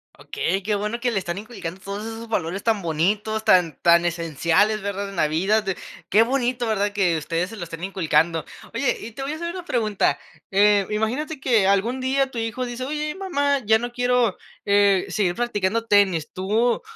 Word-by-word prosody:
Okey, 430 - -2
qué 210 +2 -1
bueno 210 +3 -2
que 245 0 0
le 205 - 0
están 175 0 -4
inculcando 200 -5 -7
todos 200 +2 -6
esos 225 +1 -7
valores 190 -3 -2
tan 220 -3 +1
bonitos, 205 +7 -1
tan, 175 -4 +4
tan 170 0 +6
esenciales, 170 +5 +1
¿verdad?, 200 0 -3
en 195 - -9
la 155 - +3
vida, 190 +8 +2
de 195 -3 -3 0.3
qué 215 +3 +6
bonito, 250 -1 0
¿verdad?, 205 -2 0
que 190 -5 +1
ustedes 165 +4 -2
se - - -8
lo 200 - -5
estén 165 +1 -9
inculcando. 165 -4 +1 0.3
Oye, - - 0
y 230 - -8
te 270 - -8
voy 280 +3 -3
a - - -4
hacer 340 +1 -4
una 365 -1 -6
pregunta. 215 - 0 0.3
Eh, 200 0 +4
imagínate 250 +9 -2
que 235 -7 +3
algún 210 +6 +1
día 270 +1 0
tu 235 - -4
hijo 225 +3 -2
dice: 245 +1 -5
"Oye 300 +1 -3
mamá, 285 -8 0
ya 220 +1 +4
no 240 +2 -5
quiero, 245 -3 +1 0.3
eh, 200 -2 +4
seguir 180 -4 0
practicando 230 -2 -1
tenis". 195 -7 +2
Tú 215 +6 +1
210 Hz, 195 wpm, -23 LUFS, 190-240 Hz, 0.3 s, tan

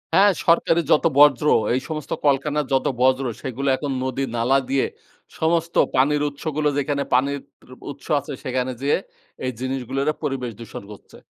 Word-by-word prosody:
হ্যাঁ 200 +1 +6
সরকারি 170 0 +3
যত 150 - +4
বর্জ্য 145 -1 +6 0.3
এই 130 - +2
সমস্ত 155 -2 -5
কল-কারখানার 145 +1 +1
যত 130 - +2 0.2
বর্জ, 130 +1 +3 0.2
সেগুলো 135 +1 -4
এখন 145 -2 -4
নদী 130 +1 -2
নালা 125 +4 +3
দিয়ে 135 -1 +2 0.5
সমস্ত 165 +1 0 0.2
পানির 145 +3 +3
উৎসগুলো 150 +1 -2
যেখানে 140 0 0
পানির 140 +3 +2 0.2
ত 130 - -19 0.2
উৎস 140 - -13
আছে 140 +1 -8
সেখানে 130 0 -1
যেয়ে 140 - +2 0.5
এই 130 - 0
জিনিসগুলোরে 135 +3 -2
পরিবেশ 125 -4 -2
দূষণ 115 -3 -8
করছে। 105 - -14
140 Hz, 155 wpm, -22 LUFS, 130-150 Hz, 0.5 s, হ্যাঁ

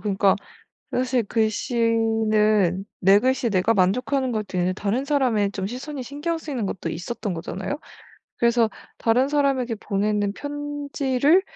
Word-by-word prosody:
그러니까 200 -1 +2 0.6
사실 250 -1 +1
글씨는 220 -3 +1
내 195 +2 +6
글씨에 255 -1 +1
내가 200 +3 +2
만족하는 250 +7 +1
것도 210 -4 -3
있는데 180 +1 +1
다른 210 +8 -1
사람의 250 -9 +2
좀 195 -2 -3
시선이 260 +4 -6
신경 295 +6 -3
쓰이는 275 -9 -4
것도 180 -3 -4
있었던 190 +4 -4
거잖아요. 190 - -4 0.6
그래서 235 -1 +3 0.3
다른 245 +4 +2
사람에게 275 -5 +1
보내는 205 0 0
편지를 290 +1 0
230 Hz, 320 characters per minute, -24 LUFS, 200-265 Hz, 0.6 s, 내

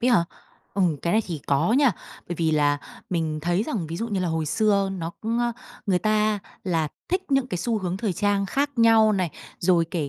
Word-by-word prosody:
ấy 250 - +3
hả? 210 -8 +4 0.5
Ừ, 195 - +2 0.2
cái 170 - 0
này 220 +1 +3
thì 165 -5 -4
có 145 +9 +2
nha. 270 -1 +4 0.4
Bởi 175 - -2
vì 165 -1 +1
là 145 -2 +2 0.3
mình 160 -3 -1
thấy 175 +4 +1
rằng 220 - -3
ví 165 +2 -5
dụ 230 +6 -3
như 200 -4 -1
là 180 - 0
hồi 160 -1 -1
xưa 200 +3 +2
nó 170 -3 -4
cũng, 225 +2 -1
ơ, 240 0 +1 0.3
người 185 -3 +3
ta 215 +1 +2 0.3
là 165 -5 0 0.2
thích 370 +2 0
những 270 -1 +3
cái 180 -8 -3
xu 230 +4 0
hướng 185 -2 -2
thời 200 -1 -1
trang 200 +2 +1
khác 280 +7 0
nhau 225 -2 +6
này, 185 -5 0 0.3
rồi 175 -2 +3
kể 160 -6 -2
195 Hz, 225 wpm, -25 LUFS, 170-225 Hz, 0.5 s, nhau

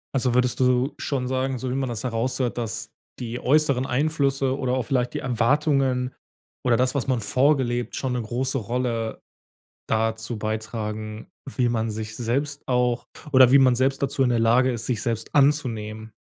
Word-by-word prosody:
Also, 125 -2 +1
würdest 125 0 +2
du 125 +2 +2
schon 130 -3 -2
sagen, 130 0 -1
so 130 +1 -4
wie - - -2
man 135 -1 -1
das 115 -3 -4
heraushört, 125 +1 -1
dass 110 -1 -4 0.3
die 120 -1 -5
äußeren 140 -2 +2
Einflüsse 135 -1 +1
oder 125 -2 0
auch 130 - 0
vielleicht 125 0 -1
die - - -1
Erwartungen 130 +1 +1 0.5
oder 120 -2 +3
das, 125 +1 +1
was 140 -5 -2
man 130 -3 +1
vorgelebt 125 +1 +1
schon 130 -2 -2
'ne 125 - -1
große 130 +4 -2
Rolle 115 0 -2 0.7
dazu 110 +1 -1
beitragen, 110 0 -4 0.3
wie 125 -2 +3
man 115 -1 -1
sich 110 0 -5
selbst 140 +5 -2
auch 125 -1 +1 0.3
oder 130 -1 +7
wie 140 - +8
man 130 -2 +5
selbst 135 +2 +1
dazu 135 -1 +1
in 125 - +2
der 120 -1 +2
Lage 120 +3 +4
ist, 115 -2 -4
sich 120 -4 -1
selbst 115 -1 -3
anzunehmen. 115 -7 +1
125 Hz, 175 wpm, -24 LUFS, 115-130 Hz, 0.7 s, wie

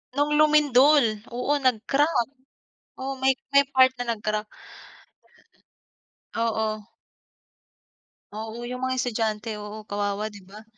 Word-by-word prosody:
Noong 290 +1 +1
lumindol. 290 -6 +4
Oo, 250 +4 0
nag-crack. 270 +1 +1 0.7
Oo, 270 +1 -4
may 265 - +5 0.2
may 280 - +8
part 260 -1 +5
na 235 -1 -1
nag-crack. 215 0 -3 1.9
Oo. 220 -2 -1 1.5
Oo, 220 +2 -6
yung 250 +1 -5
mga 260 - -1
estudyante. 225 -3 -2
Oo, 210 +1 -8
kawawa, 205 +1 -3
di 205 - -12
ba? 210 +3 -12
235 Hz, 105 wpm, -25 LUFS, 215-265 Hz, 1.9 s, may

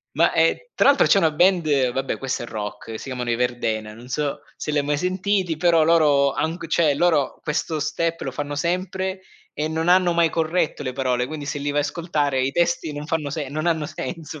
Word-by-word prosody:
Ma, - - +3
e - - +1
tra - - +4
l'altro 285 - +5
c'è 200 - +5
una 160 -4 +3
band, 150 -7 +2
vabbè 135 +1 -2
questa 135 -2 -3
è - - -5
rock, 110 +1 -6
si - - -9
chiamano 125 -3 -4
i 115 - +1
Verdena, 110 -3 -2
non 120 +2 -13
so 145 +2 -2 0.2
se 150 - -4
l'hai 145 -1 +2
mai 145 +1 0
sentiti, 185 -1 0
però 165 -1 +4
loro, 145 -4 +4
han 160 +2 -1
g 170 - -7
cioè, 155 -3 +2
loro 155 -3 +1
questo 155 +1 -2
step 165 +2 -2
lo 135 - -4
fanno 145 +1 -4
sempre 185 +3 -2 0.3
e 150 +1 -2
non 160 +1 -2
hanno 180 -1 +4
mai 170 -1 +3
corretto 160 -1 -1
le 130 -2 -3
parole, 125 -1 0
quindi 155 -2 -6
se 145 0 -3
li 145 0 -1
vai 145 - 0
a - - +3
ascoltare 145 -4 -1
i 135 - +1
testi 170 0 0
non 145 +1 -6
fanno 155 -4 -2
se 145 -3 -4
non 155 +3 -3
hanno 160 -3 +1
senso 155 -1 -7
150 Hz, 220 wpm, -23 LUFS, 135-170 Hz, 0.3 s, l'altro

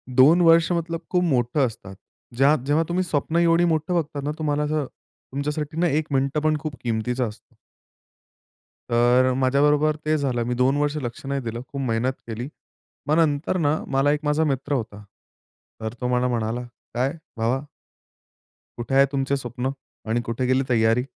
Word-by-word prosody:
2 155 +8 +6
वर्ष 165 +1 +5
मतलब 165 -1 -1
खूप 180 -1 +2
मोठं 135 -2 +2
असतात. 105 -4 -10 0.4
ज्या 140 +4 +5
जेव्हा 150 +3 +2
तुम्ही 180 +2 +1
स्वप्न 160 -1 -1
एवढी 170 0 +4
मोठं 160 +1 0
बघतात 150 -4 -2
ना, 145 - -1
तुम्हाला 150 -1 0
असं 150 -1 -1 0.5
तुमच्यासाठी 150 +2 -3
ना 175 - +3
एक 155 0 0
मिनिटं 135 +2 +1
पण 155 0 +2
खूप 155 -2 -5
किमतीचा 120 +2 -1
असतो. 105 - -13 1.4
तर 120 +2 +4
अ, - - 0
माझ्याबरोबर 145 +3 +3
ते 155 0 +2
झालं 130 -5 -1
मी 125 - 0
2 135 +3 +3
वर्ष 145 0 0
लक्ष 120 +1 -6
नाही 140 0 -2
दिलं 115 -1 -5
खूप 140 - -5
मेहनत 125 +1 0
केली. 115 +3 -5 0.6
मग 150 - +3
नंतर 160 +2 +1
ना, 155 -2 +2
मला 135 +1 +2
एक 150 - 0
माझा 150 +1 +2
मित्र 140 -1 -1
होता. 110 -5 -4 0.8
तर 110 0 -4
तो 125 - 0
मला 125 +1 +1
म्हणाला, 115 0 -1 0.3
"काय 130 +4 0 0.2
भावा" 115 +4 +1 1.2
"कुठे 120 +3 -2
आहे 135 0 +7
तुमचं 135 0 0
स्वप्न 125 -1 -3 0.4
आणि 120 +2 +1
कुठे 115 +2 -1
गेली 130 +1 +2
तयारी?" 115 0 +3
140 Hz, 170 wpm, -23 LUFS, 125-155 Hz, 1.4 s, आहे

